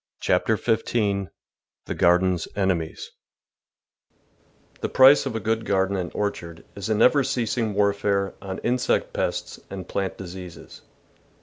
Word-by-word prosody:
CHAPTER 110 - +1
FIFTEEN 105 -4 0 0.6
THE - - -3
GARDENS 90 0 +2
ENEMIES 95 -5 -2 1.7
1 - - -30
HE - - 0
price 135 +2 +6
of - - -4
a - - -1
good 110 +1 -1
garden 95 -1 +1
and 90 -2 -2
orchard 85 -5 -4
is 100 +1 -5
a 110 - +2
never 135 +6 +4
ceasing 120 -4 -1
warfare 100 -1 +1
on 95 -1 -5
insect 125 +1 0
pests - - -3
and 95 -2 -7
plant 95 -1 -3
diseases. 90 -2 -10
100 Hz, 130 wpm, -24 LUFS, 95-110 Hz, 1.7 s, price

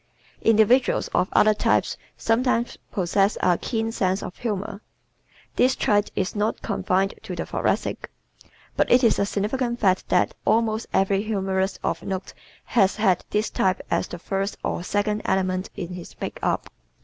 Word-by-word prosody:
Individuals 225 +4 +3
of 180 +1 +1
other 215 0 +5
types 210 - +1 0.2
sometimes 235 +1 +1
possess 195 +1 +1
a 180 -1 +3
keen 225 -1 -2
sense 190 -3 0
of 180 - -7
humor. 205 -3 -4 0.8
This 255 +1 +4
trait 205 0 +2
is 185 - -1
not 210 +2 -1
confined 195 -2 0
to - - -6
the - - -3
Thoracic. - - -1 0.7
But - - +1
it 250 +1 +6
is 230 - +4
a 200 - +1
significant 235 +4 -1
fact 190 -3 +2
that - - +2
almost 220 0 +1
every 195 0 +2
humorist 195 -2 -1
of - - -1
note 190 -1 -5 0.3
has 195 -5 +2
had 195 -5 +2
this 210 +1 0
type 190 0 +1
as - - +1
the 175 - -7
first 195 +3 -3
or - - -2
second 210 +2 0
element 185 0 0
in 175 - -5
his 180 -1 -9
makeup. - - -2
205 Hz, 155 wpm, -24 LUFS, 190-225 Hz, 0.8 s, it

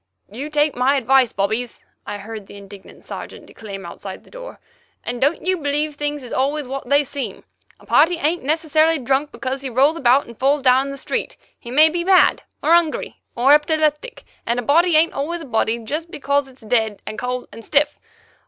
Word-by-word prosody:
"You 270 +8 -6
take 300 0 +1
my 255 +3 +2
advice, 265 -1 +3
bobbies," 220 +5 -2 0.2
I 205 - -4
heard 210 0 -9
the - - -12
indignant 200 -1 -13
Sergeant - - -8
declaim 200 -3 -9
outside - - -9
the - - -21
door, - - -10 0.4
"and 245 +1 -5
don't 295 +5 +1
you 370 0 +1
believe 295 0 -1
things 290 -1 -3
is 245 - -8
always 280 +2 -1
what 270 +1 -6
they 285 +1 +4
seem. 280 0 -6 0.4
A - - -19
party 330 +4 +4
ain't 325 +3 0
necessarily 315 +2 +2
drunk 270 +2 0
because 265 +1 -4
he 270 - -4
rolls 275 +6 +3
about 265 -1 +3
and 235 - -12
falls 275 +1 +2
down 260 +1 +4
in - - -5
the 275 - -7
street; - - -3 0.2
he 235 - -11
may 300 +6 +6
be 340 +2 -2
mad, 370 0 +4 0.2
or 320 - +2
'ungry, 340 -3 +1
or 250 +4 +3
epileptic, 305 +8 +1 0.2
and 235 - -1
a - - -3
body 330 +6 +3
ain't 320 +2 +4
always 335 +5 -3
a - - -8
body 225 -2 0
jest 300 +9 -5
because 280 -2 -1
it's 260 -2 -18
dead 220 -3 0
and 215 - -6
cold 250 0 -3
and 230 - -11
stiff. 295 +3 +1
280 Hz, 200 wpm, -20 LUFS, 245-305 Hz, 0.4 s, may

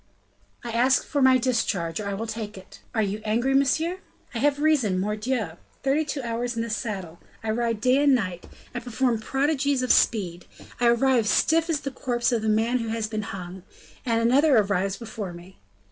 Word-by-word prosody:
"I 240 - -5
ask 250 +3 +3
for 285 - -1
my 260 -1 +6
discharge, 225 -9 -1
or 210 - -4
I 200 - -2
will 220 +3 -4
take 220 -2 -6
it." 190 +1 -13 0.2
"You 205 0 0
are - - -17
angry, 235 +5 +1
monsieur?" 315 +7 +2 0.3
"I 235 - -3
have 285 +2 +2
reason, 275 -12 +2
mordioux! 210 -2 -2 0.3
Thirty 275 +3 +2
two 280 -2 -4
hours 240 +1 -2
in 230 - -1
the 230 - -5
saddle, 190 -7 -4 0.2
I 220 - -1
ride 230 -1 -1
day 255 +4 +3
and 285 -2 +5
night, 185 -7 -3 0.3
I 245 - -3
perform 245 -1 0
prodigies 275 +2 0
of 255 - +4
speed, 180 -6 +1 0.3
I 240 - +3
arrive 235 -1 +3
stiff 325 +9 +3
as 310 -4 0
the 275 - -4
corpse 245 -2 -1
of 230 -3 0
a 220 - +1
man 225 +4 +2
who 230 - -3
has 225 -1 -1
been 215 0 -3
hung 185 -2 -7 0.4
and 230 -3 +1
another 265 +4 +4
arrives 195 -2 +1
before 215 -5 -6
me! 175 +2 -13
230 Hz, 195 wpm, -25 LUFS, 210-260 Hz, 0.4 s, my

